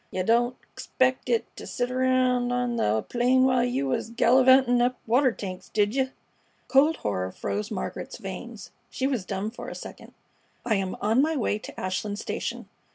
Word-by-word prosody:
"Yeh 185 Hz, -, -2 dB
didn't 240 Hz, +4 st, +2 dB, 0.2 s
'xpect 260 Hz, 0 st, 0 dB
it 460 Hz, -1 st, +2 dB
t' -, -, -9 dB
sit 245 Hz, 0 st, -3 dB
reound 255 Hz, -1 st, +2 dB
on 245 Hz, -1 st, 0 dB
th' 110 Hz, -, 0 dB
plain 250 Hz, +2 st, +3 dB
while 255 Hz, -2 st, +3 dB
you 245 Hz, -, 0 dB
was 135 Hz, -, -1 dB
gallivantin' 250 Hz, +1 st, +5 dB
up 250 Hz, +1 st, +1 dB
water 255 Hz, +3 st, +3 dB
tanks, 185 Hz, -5 st, -7 dB
did 205 Hz, 0 st, +1 dB
yeh?" 265 Hz, 0 st, +1 dB, 0.6 s
Cold 295 Hz, +4 st, +4 dB
horror 95 Hz, -2 st, -1 dB
froze 210 Hz, -, -3 dB
Margaret's 215 Hz, -, -5 dB
veins. -, -, -8 dB, 0.2 s
She 260 Hz, -, -3 dB
was 255 Hz, -8 st, -1 dB
dumb 195 Hz, +3 st, -3 dB
for 240 Hz, -, -8 dB
a -, -, -7 dB
second. -, -, -10 dB, 0.5 s
"I 235 Hz, -, +1 dB
am 195 Hz, -2 st, -1 dB
on 220 Hz, +5 st, +3 dB
my 320 Hz, +2 st, +1 dB
way 215 Hz, -5 st, 0 dB
to -, -, -10 dB
Ashland 200 Hz, +2 st, -3 dB
station. -, -, -4 dB
245 Hz, 175 wpm, -26 LUFS, 210-255 Hz, 0.6 s, gallivantin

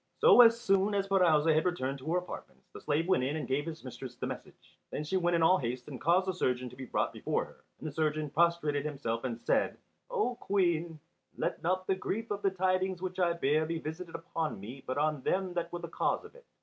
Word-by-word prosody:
So, -, -, +8 dB
as 230 Hz, -1 st, +7 dB
soon 195 Hz, -1 st, +2 dB
as 195 Hz, 0 st, 0 dB
Pirouzè 165 Hz, -5 st, +4 dB
had 155 Hz, +2 st, +2 dB
returned 140 Hz, -6 st, -1 dB
to 145 Hz, +5 st, -4 dB
her 175 Hz, -, +3 dB
apartments, 65 Hz, -, -7 dB
the -, -, -9 dB
slave 155 Hz, +3 st, 0 dB
went 185 Hz, -9 st, +3 dB
in 140 Hz, +4 st, -1 dB
and 155 Hz, -, -3 dB
gave 145 Hz, +4 st, -1 dB
his 165 Hz, -1 st, -6 dB
mistress 125 Hz, 0 st, -8 dB
the -, -, -4 dB
message. -, -, -9 dB
Then 150 Hz, -, -3 dB
she 155 Hz, +5 st, -2 dB
sent 175 Hz, -2 st, +2 dB
in 165 Hz, -, +2 dB
all 185 Hz, +3 st, +5 dB
haste 125 Hz, -1 st, -4 dB
and 135 Hz, -4 st, -8 dB
caused 175 Hz, +4 st, +3 dB
the 190 Hz, -, -1 dB
surgeon 125 Hz, -7 st, -1 dB
to -, -, -12 dB
be 130 Hz, 0 st, -7 dB
brought -, -, 0 dB
before -, -, -1 dB
her. -, -, -18 dB
And 155 Hz, -, -6 dB
the -, -, -4 dB
surgeon 155 Hz, -1 st, -1 dB
prostrated 155 Hz, -3 st, +2 dB
himself 135 Hz, -6 st, -3 dB
and 120 Hz, -3 st, -3 dB
said, -, -, +1 dB, 0.3 s
"O 425 Hz, -, 0 dB
Queen, 170 Hz, -6 st, 0 dB, 0.4 s
let -, -, -2 dB
not 185 Hz, +2 st, 0 dB
the 190 Hz, -, +2 dB
grief 215 Hz, +4 st, -3 dB
of 205 Hz, 0 st, -2 dB
the 200 Hz, -, +3 dB
tidings 185 Hz, 0 st, 0 dB
which 185 Hz, 0 st, -4 dB
I 175 Hz, -2 st, +3 dB
bear 155 Hz, -1 st, +1 dB
be 165 Hz, 0 st, -2 dB
visited 165 Hz, +2 st, -6 dB
upon 165 Hz, -, -3 dB
me 125 Hz, +7 st, -9 dB
but 130 Hz, -, -2 dB
on 150 Hz, -1 st, +1 dB
them 185 Hz, +5 st, 0 dB
that 170 Hz, -1 st, -2 dB
were 175 Hz, -, -3 dB
the -, -, -6 dB
cause -, -, -1 dB
of -, -, -13 dB
it." -, -, -17 dB
165 Hz, 240 wpm, -31 LUFS, 145-185 Hz, 0.4 s, So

